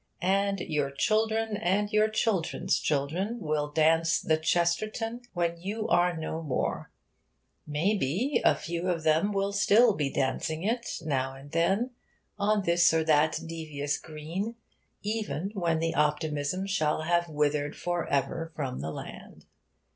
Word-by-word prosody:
And 195 Hz, +1 st, +1 dB
your 145 Hz, -4 st, -1 dB
children 220 Hz, +8 st, +1 dB
and 205 Hz, +1 st, 0 dB
your 215 Hz, 0 st, +4 dB
children's 215 Hz, -5 st, 0 dB
children 160 Hz, +10 st, -1 dB
will 150 Hz, -4 st, -1 dB
dance 160 Hz, +2 st, +3 dB
'The 155 Hz, -, +1 dB
Chesterton' 215 Hz, +9 st, 0 dB
when 170 Hz, -2 st, -1 dB
you 215 Hz, +4 st, -3 dB
are 175 Hz, -1 st, +3 dB
no 160 Hz, 0 st, -4 dB
more. 145 Hz, -5 st, -2 dB, 0.8 s
May 160 Hz, +8 st, +1 dB
be, 200 Hz, -, 0 dB
a -, -, +5 dB
few 170 Hz, +2 st, -3 dB
of 165 Hz, -3 st, -1 dB
them 160 Hz, +6 st, +3 dB
will 200 Hz, 0 st, 0 dB
still 215 Hz, +3 st, +5 dB
be 145 Hz, -6 st, -1 dB
dancing 155 Hz, +5 st, -1 dB
it 235 Hz, +3 st, -1 dB, 0.2 s
now 135 Hz, -3 st, -1 dB
and 140 Hz, +2 st, -13 dB
then, 195 Hz, +9 st, +1 dB, 0.5 s
on 205 Hz, 0 st, +2 dB
this 170 Hz, -1 st, +4 dB
or 160 Hz, -, +3 dB
that 155 Hz, 0 st, +3 dB
devious 155 Hz, -3 st, -3 dB
green, 165 Hz, +9 st, -5 dB, 0.5 s
even 210 Hz, -3 st, -2 dB
when 170 Hz, -5 st, 0 dB, 0.2 s
optimism 150 Hz, +3 st, 0 dB
shall 155 Hz, -5 st, 0 dB
have 170 Hz, +1 st, +1 dB
withered 150 Hz, -1 st, 0 dB
for 175 Hz, -1 st, -2 dB
ever 145 Hz, +4 st, -1 dB
from 135 Hz, -4 st, -3 dB
the 80 Hz, -, -3 dB
land. -, -, -9 dB
170 Hz, 140 wpm, -28 LUFS, 150-200 Hz, 0.8 s, a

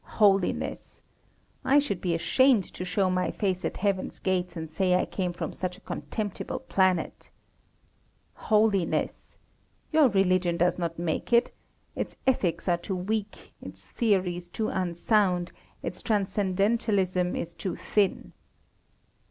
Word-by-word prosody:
Holiness! 195 Hz, -3 st, +1 dB, 0.6 s
I 275 Hz, -, +4 dB
should 240 Hz, -11 st, +1 dB
be 175 Hz, -3 st, 0 dB
ashamed 250 Hz, +6 st, +4 dB
to -, -, -5 dB
show 185 Hz, +1 st, +1 dB
my 185 Hz, 0 st, 0 dB
face 190 Hz, -3 st, -1 dB
at -, -, -2 dB
Heaven's 195 Hz, -1 st, -1 dB
gates 180 Hz, -2 st, -1 dB
and 160 Hz, 0 st, -4 dB
say 180 Hz, +3 st, +1 dB
I 180 Hz, -, +2 dB
came 180 Hz, -2 st, -2 dB
from 175 Hz, -, -5 dB
such 180 Hz, 0 st, -4 dB
a -, -, -19 dB
contemptible 210 Hz, -3 st, -4 dB
planet. 190 Hz, -9 st, 0 dB, 1.0 s
Holiness! 210 Hz, -4 st, 0 dB, 0.5 s
Your 310 Hz, -3 st, +6 dB
religion 185 Hz, -3 st, +2 dB
does 175 Hz, +1 st, +2 dB
not 170 Hz, -1 st, -2 dB
make 170 Hz, +5 st, -2 dB
it 235 Hz, 0 st, +4 dB, 0.4 s
its -, -, -4 dB
ethics 200 Hz, -11 st, +1 dB
are 175 Hz, -1 st, +3 dB
too 185 Hz, +3 st, -4 dB
weak, 205 Hz, +3 st, -4 dB
its -, -, -10 dB
theories 180 Hz, -6 st, 0 dB
too 215 Hz, +4 st, -2 dB
unsound, 180 Hz, 0 st, +1 dB, 0.3 s
its -, -, -5 dB
transcendentalism 195 Hz, -2 st, +1 dB
is 170 Hz, -, -4 dB
too 170 Hz, +1 st, -4 dB
thin. 205 Hz, -3 st, 0 dB
185 Hz, 130 wpm, -27 LUFS, 180-210 Hz, 1.0 s, Your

